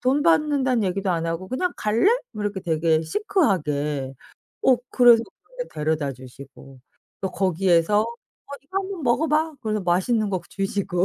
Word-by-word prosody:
돈 265 +4 +2
받는단 285 -7 +2
얘기도 190 +1 -1
안 165 -1 -1
하고 165 +3 -3
그냥 355 +8 -1
"갈래?" 215 - +2 0.2
뭐 215 -1 -6
이렇게 205 -2 -2
되게 160 -2 +1
시크하게. 150 - -1 0.5
어 255 - +5
그래서 240 -2 +6 0.2
근데 - - -8
데려다 150 -2 -1
주시고 130 +1 -14 0.4
또 190 -1 -2
거기에서 185 +1 +2
어 - - -3 0.6
"이거 380 +7 -3
한번 385 -4 -5
먹어 255 +6 +2
봐." 310 +1 +1
그래서 215 -3 -2
맛있는 200 +5 +1
거 185 -2 -1
주시고. 195 -2 -1
195 Hz, 320 characters per minute, -23 LUFS, 165-260 Hz, 0.6 s, 그래서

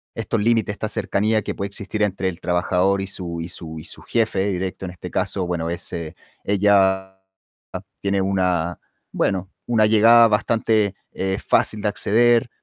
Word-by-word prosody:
estos 110 - -2
límites, 115 -2 +1
esta 110 - -4
cercanía 110 +2 0
que - - -3
puede 100 - -4
existir 100 +1 -4
entre 95 -2 0
el 85 0 -8
trabajador 90 +2 +1
y 95 - -4
su 85 -3 -5
y 85 - -6
su 80 -2 -7
y 75 - -8
su - - -9
jefe 110 -4 0
directo, 95 0 -3
en 90 - -5
este 90 - -9
caso, 95 -2 -1
bueno, 85 -2 -2
ese 85 -1 -4 0.3
ella 95 -1 +2 0.8
tiene 100 0 0
una, 90 -3 0 0.3
bueno, 95 0 -1 0.2
una 110 -3 +3
llegada 115 +2 +6
bastante, 110 -2 +1 0.2
eh, 95 0 -2
fácil 105 -1 +2
de 105 - +1
acceder. 120 +4 +2
95 Hz, 160 wpm, -22 LUFS, 90-105 Hz, 0.8 s, llegada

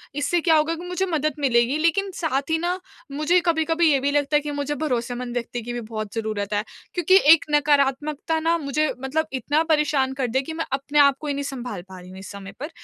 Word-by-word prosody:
इससे 295 +4 0
क्या 325 -1 +4
होगा 310 +2 +2
कि 340 +2 -8
मुझे 360 +1 -1
मदद 310 -4 -1
मिलेगी 250 0 +2
लेकिन 335 +5 +1
साथ 280 -2 -1
ही 320 - +2
ना 350 +3 -1 0.3
मुझे 305 +5 +2
कभी-कभी 325 -1 +2
ये 275 - +3
भी 280 +2 0
लगता 290 +1 +1
है 295 - +4
कि 295 0 -5
मुझे 290 0 -2
भरोसेमंद 245 -4 -3
व्यक्ति 240 0 -3
की 240 +2 -6
भी 240 - -4
बहुत 215 -2 -6
ज़रूरत 215 -2 -3
है। 205 0 0 0.3
क्योंकि 355 +1 +3 0.2
एक 330 - +1
नकारात्मकता 295 +2 +1
ना 330 +1 +1
मुझे 305 0 0
मतलब 310 +4 -1
इतना 290 +5 +1
परेशान 295 -3 +1
कर 265 -2 -2
दे 260 +3 0
कि 320 +4 -7
मैं 325 +1 -3
अपने 280 +2 0
आप 280 -1 +5
को 305 - -6
ही 285 - 0
नहीं 280 0 -3
सँभाल 245 -8 -5
पा 185 -1 -10
रही 180 - -13
हूँ 190 +1 -10
इस 195 - -9
समय 195 -1 -9
पर। 295 +4 -5
285 Hz, 235 wpm, -23 LUFS, 250-315 Hz, 0.3 s, आप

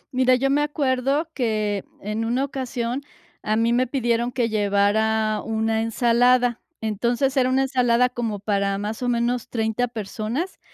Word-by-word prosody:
Mira, 255 0 +4
yo 270 +2 +1
me 290 +1 +3
acuerdo 285 +1 0
que, 215 -6 -1 0.2
en 210 +2 -3
una 240 +4 0
ocasión, 255 -2 -3 0.4
a 215 - 0
mí 230 +1 +2
me 255 +1 +2
pidieron 240 -2 0
que 245 -2 0
llevara 215 +1 +1
una 220 0 0
ensalada. 240 +1 +2 0.2
Entonces, 235 +5 0
era 255 -2 +3
una 265 +1 +2
ensalada 250 -2 +2
como 230 -4 -3
para 200 -1 0
más 210 +3 -4
o 250 - 0
menos 240 0 0
30 225 +1 -1
personas, 230 - -4
235 Hz, 150 wpm, -23 LUFS, 220-255 Hz, 0.4 s, Mira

